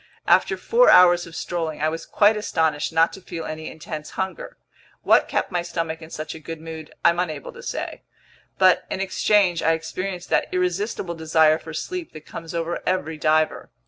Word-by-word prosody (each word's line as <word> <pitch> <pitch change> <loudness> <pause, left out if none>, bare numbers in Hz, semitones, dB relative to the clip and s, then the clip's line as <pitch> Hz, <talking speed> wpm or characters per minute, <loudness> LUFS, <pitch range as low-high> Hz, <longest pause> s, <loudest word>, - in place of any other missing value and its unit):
After - - +3
four - - +4
hours 175 -1 +6
of 165 - -12
strolling, 165 -3 -3
I 155 - +1
was 165 +1 -6
quite 210 +1 +4
astonished 160 -8 0
not 165 +1 +3
to 190 - -10
feel 170 -3 -6
any 155 0 -6
intense 155 -1 -7
hunger. 190 0 -4 0.5
What - - +4
kept - - -1
my 175 -1 0
stomach 165 -2 -4
in 160 - -10
such 155 -1 -6
a 160 - -9
good 165 +1 -7
mood 160 -1 -9
I'm 170 +1 +5
unable 180 - -3
to 485 - -11
say. - - -5 0.6
But, 185 -1 +4
in - - -3
exchange, 195 -2 +2
I 165 - +3
experienced 175 +3 -5
that - - +1
irresistible 180 +1 -1
desire 160 -1 +3
for 160 -1 -9
sleep 365 - -5
that 155 - -11
comes 165 0 -8
over 170 +1 -2
every 160 -4 -2
diver. 155 +1 +1
165 Hz, 185 wpm, -23 LUFS, 160-185 Hz, 0.6 s, hours